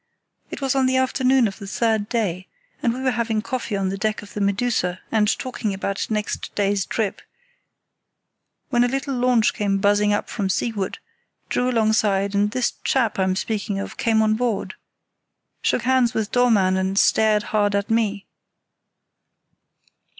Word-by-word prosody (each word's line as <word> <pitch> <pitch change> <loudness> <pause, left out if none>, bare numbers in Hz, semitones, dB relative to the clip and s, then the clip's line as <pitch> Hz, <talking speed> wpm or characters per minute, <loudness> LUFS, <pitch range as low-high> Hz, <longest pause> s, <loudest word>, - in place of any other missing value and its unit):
It - - -7
was 270 -2 +1
on 265 -1 +2
the 260 0 +2
afternoon 260 -1 +3
of 195 - -7
the 200 - -8
third 220 0 0
day, 190 -6 -2 0.3
and 235 - +2
we 250 +2 -5
were 260 - +2
having 225 -2 -1
coffee 235 -5 -3
on 195 -1 -1
the 195 +1 -4
deck 215 0 -1
of 205 - -13
the 210 - -4
Medusa, 200 -3 0
and 215 -2 +3
talking 225 -6 -3
about 195 0 -3
next 210 -1 -3
day's 200 -2 0
trip, 215 -4 -2 1.5
when 240 -2 +3
a - - +3
little 270 +2 -2
launch 245 -3 +2
came 200 -1 0
buzzing 205 +1 +3
up 205 - 0
from 200 -4 -3
seaward, 200 -1 -2 0.5
drew 250 0 +1
alongside, 215 -4 +1
and 205 +1 +2
this 250 +2 0
chap 235 -7 +1
I'm 190 0 +1
speaking 205 0 -2
of 195 - -5
came 220 -2 +2
on 215 0 +2
board, 230 -2 -1 0.9
shook - - 0
hands 255 -1 +2
with 220 -2 -1
Dollmann, 210 -7 +3
and 190 +1 -1
stared 215 0 +3
hard 205 -1 +2
at 200 +3 -1
me. 210 -3 0
215 Hz, 165 wpm, -22 LUFS, 200-240 Hz, 1.5 s, afternoon